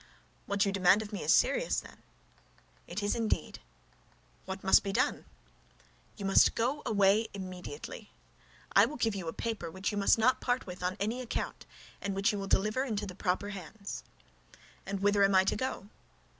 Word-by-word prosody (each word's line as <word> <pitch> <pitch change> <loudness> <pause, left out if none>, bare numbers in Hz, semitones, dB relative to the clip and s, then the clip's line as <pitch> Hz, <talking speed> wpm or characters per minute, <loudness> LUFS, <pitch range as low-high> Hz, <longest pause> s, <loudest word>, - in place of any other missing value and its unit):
"What 200 0 +2
you 200 - +1
demand 195 +2 +4
of 210 0 -10
me 205 - -3
is - - +2
serious, - - +3
then?" - - -14 0.9
"It 190 +4 -4
is 205 - +1
indeed." 225 -2 -2 0.9
"What 190 0 -6
must 190 - +6
be 200 - -3
done?" - - 0 0.9
"You 200 - -5
must 195 - +5
go 260 +6 0
away 205 +1 +3
immediately. 190 - -7 0.7
I - - +7
will 300 - -7
give 225 -3 +1
you 190 -4 -5
a - - -1
paper 225 -3 -4
which 190 +4 -3
you 205 - -2
must 200 - +4
not 255 +3 +3
part 250 0 0
with 180 -1 -8
on 180 +1 -2
any 225 +6 -1
account, 245 - -4 0.3
and 200 -1 -3
which 195 +1 +2
you 205 - -3
will 195 - -4
deliver 215 +7 +1
into 215 -6 -2
the 185 - -7
proper 190 +2 -1
hands." 200 +1 -7 0.8
"And 195 0 -3
whither 205 0 +3
am 195 0 +4
I 190 - +6
to - - 0
go?" 210 -4 -4
200 Hz, 185 wpm, -31 LUFS, 195-225 Hz, 0.9 s, I